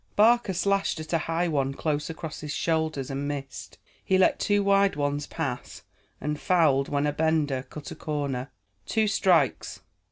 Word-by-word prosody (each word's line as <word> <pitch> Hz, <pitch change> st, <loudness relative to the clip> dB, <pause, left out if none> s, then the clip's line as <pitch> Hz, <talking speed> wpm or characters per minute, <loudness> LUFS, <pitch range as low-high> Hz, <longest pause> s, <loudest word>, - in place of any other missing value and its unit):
Barker 225 Hz, -1 st, +4 dB
slashed 195 Hz, -2 st, +1 dB
at 155 Hz, +2 st, -6 dB
a 165 Hz, -, +3 dB
high 165 Hz, +2 st, -1 dB
one 135 Hz, -4 st, 0 dB
close 150 Hz, 0 st, -2 dB
across 160 Hz, -1 st, -6 dB
his 150 Hz, -1 st, -5 dB
shoulders 160 Hz, -4 st, -1 dB
and 140 Hz, +1 st, -3 dB
missed. 140 Hz, -2 st, -6 dB, 0.3 s
He 190 Hz, -, +2 dB
let 185 Hz, -, +3 dB
two 205 Hz, 0 st, +2 dB
wide 200 Hz, -1 st, +3 dB
ones 145 Hz, 0 st, -1 dB
pass, 140 Hz, -7 st, -5 dB, 0.4 s
and 150 Hz, 0 st, -3 dB
fouled 150 Hz, -7 st, +3 dB
when 145 Hz, 0 st, 0 dB
a 145 Hz, -, 0 dB
bender 155 Hz, -4 st, +1 dB
cut 150 Hz, -, -8 dB
a -, -, -6 dB
corner. 140 Hz, -4 st, -3 dB, 0.4 s
"Two 220 Hz, -1 st, +1 dB
strikes!" 190 Hz, -4 st, +1 dB
155 Hz, 165 wpm, -26 LUFS, 145-180 Hz, 0.4 s, Barker